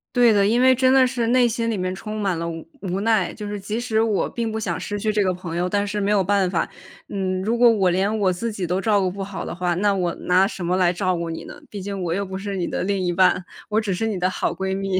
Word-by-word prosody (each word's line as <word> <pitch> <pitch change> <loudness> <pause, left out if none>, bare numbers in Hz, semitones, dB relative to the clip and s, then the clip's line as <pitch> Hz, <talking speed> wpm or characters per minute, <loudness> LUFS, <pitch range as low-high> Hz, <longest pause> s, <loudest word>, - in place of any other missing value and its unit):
对 240 -2 +6
的， 200 -1 +4
因 230 +3 +2
为 260 +1 +6
真 255 0 +3
的 265 -1 +6
是 245 -2 -1
内 245 +1 +4
心 230 0 -1
里 220 - -1
面 185 0 -2
充 215 +3 -6
满 195 -4 0
了 170 0 -2
无 165 -1 -7
无 190 -1 -2
奈， 220 -3 +2
就 210 -2 -7
是 205 0 -4
即 210 +3 -3
使 230 -3 0
我 220 -3 +1
并 230 -2 -3
不 220 - -3
想 180 -6 -2
失 205 - -4
去 215 +1 -1
这 210 -1 +2
个 185 - +2
朋 180 -2 -6
友， 175 +1 0
但 205 +1 +1
是 205 0 -2
没 200 - 0
有 205 -2 +3
办 195 -1 +2
法。 170 -3 0 0.4
嗯， 185 -2 -2
如 225 +4 0
果 240 0 +6
我 195 -5 +3
连 195 +4 +1
我 190 -3 +2
自 230 +6 -3
己 195 -4 -3
都 180 +3 -1
照 210 0 +3
顾 190 -1 +1
不 195 +1 -5
好 195 0 -6
的 - - -5
话， 175 0 -1
那 200 +3 +2
我 180 -3 -1
拿 185 +2 +3
什 190 -4 -6
么 180 +2 +1
来 180 -2 +3
照 185 0 0
顾 170 -1 -3
你 165 - -5
呢？ - - -9 0.2
毕 205 - -7
竟 195 +1 -5
我 170 - -2
又 200 +4 -1
不 190 0 -6
是 200 0 -4
你 180 -2 -1
的 - - -3
另 200 +1 0
一 180 -1 0
半， 180 0 +3 0.2
我 215 +1 +2
只 210 -3 -1
是 225 +5 -1
你 215 -3 -2
的 180 0 +1
好 185 - -1
闺 190 +1 -2
蜜， 195 -1 -1
195 Hz, 325 characters per minute, -22 LUFS, 185-215 Hz, 0.4 s, 对